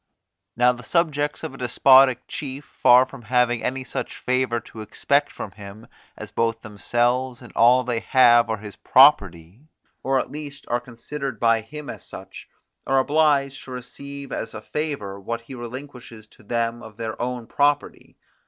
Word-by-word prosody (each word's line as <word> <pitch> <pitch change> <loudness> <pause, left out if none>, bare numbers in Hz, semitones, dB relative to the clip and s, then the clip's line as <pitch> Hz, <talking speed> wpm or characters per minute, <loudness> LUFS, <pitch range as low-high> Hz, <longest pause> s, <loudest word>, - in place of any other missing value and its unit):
Now 125 +1 +4
the 125 0 -8
subjects 150 +1 -1
of 160 - -5
a - - -12
despotic 130 +1 +5
chief, 140 0 -6
far 125 +1 +5
from 135 -1 -12
having 120 +1 +1
any 130 +1 -2
such - - -5
favour 125 -2 0
to 110 - -11
expect 140 +6 0
from 100 - -7
him, 105 +2 -12 0.3
as 105 -1 -9
both 115 0 -1
themselves 120 +4 -1
and 120 - -13
all 125 +2 +5
they 120 -2 -1
have 120 -2 +5
are 110 - -1
his 105 -1 -10
property, 100 - +3 0.3
or 135 0 +1
at - - -4
least 145 -1 -7
are 120 0 0
considered 125 +1 -7
by 115 -1 +3
him 150 +6 -9
as - - -8
such, - - -11 0.4
are 135 - +2
obliged 140 -1 +2
to 130 - -10
receive 140 +3 -9
as 115 - -5
a 110 - -6
favour 140 -12 -4
what 115 +4 -4
he 115 +3 -12
relinquishes 120 -2 -9
to - - -21
them 115 +1 -2
of 110 -2 -12
their 110 -1 -5
own 125 -1 -3
property. 145 +4 -1
125 Hz, 170 wpm, -23 LUFS, 115-135 Hz, 0.4 s, despotic